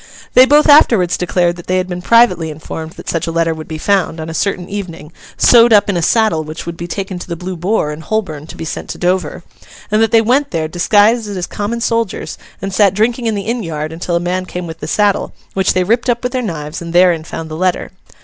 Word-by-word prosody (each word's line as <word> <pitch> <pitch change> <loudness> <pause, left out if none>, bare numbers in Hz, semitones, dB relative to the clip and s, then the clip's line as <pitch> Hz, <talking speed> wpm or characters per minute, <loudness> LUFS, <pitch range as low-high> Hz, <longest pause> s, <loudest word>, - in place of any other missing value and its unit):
They 255 +1 +7
both 295 +2 +5
afterwards 230 - +5
declared 175 0 0
that 175 - -11
they 185 - +1
had 185 0 -1
been 180 -1 -5
privately 185 -7 +3
informed 160 +1 -7
that - - -12
such 165 0 -2
a - - -2
letter 165 0 +1
would 160 -1 -9
be 160 - -5
found, 190 -1 0
on 160 +1 -5
a - - -6
certain 180 0 -2
evening, 175 -6 -7 0.3
sewed 235 -1 +6
up 205 -1 +5
in - - -3
a 170 - 0
saddle 215 -3 +2
which 155 +1 -8
would 170 - -5
be 170 +1 -6
taken 190 0 -5
to - - -8
the 170 - -4
Blue 180 +2 -6
Boar 175 -2 -1
in 150 +1 -7
Holborn 160 -7 -3
to - - -11
be - - -6
sent - - -6
to - - -5
Dover; 180 +1 -1 0.5
and 215 +1 +3
that 225 - +3
they 225 - +5
went 260 +6 +1
there, 160 -2 -2
disguised 210 +6 +2
as 185 -3 -3
common 215 +5 -4
soldiers, 230 -3 -2 0.2
and 195 0 -3
sat 195 -1 +3
drinking 235 +3 0
in 220 - 0
the 200 - -3
inn 235 +2 -2
yard 155 -3 -4
until 170 +1 -3
a - - +2
man 180 +1 -2
came 180 0 -5
with 165 -1 -8
the 150 - -6
saddle, 205 +4 +1 0.2
which 190 -1 +1
they 185 - +1
ripped 235 +6 0
up 240 0 0
with 250 - -1
their 255 - -1
knives, 155 -9 -5
and 170 0 -7
therein 175 -2 +4
found 165 0 -7
the - - -4
letter. 185 +2 -1
185 Hz, 250 wpm, -15 LUFS, 165-215 Hz, 0.5 s, They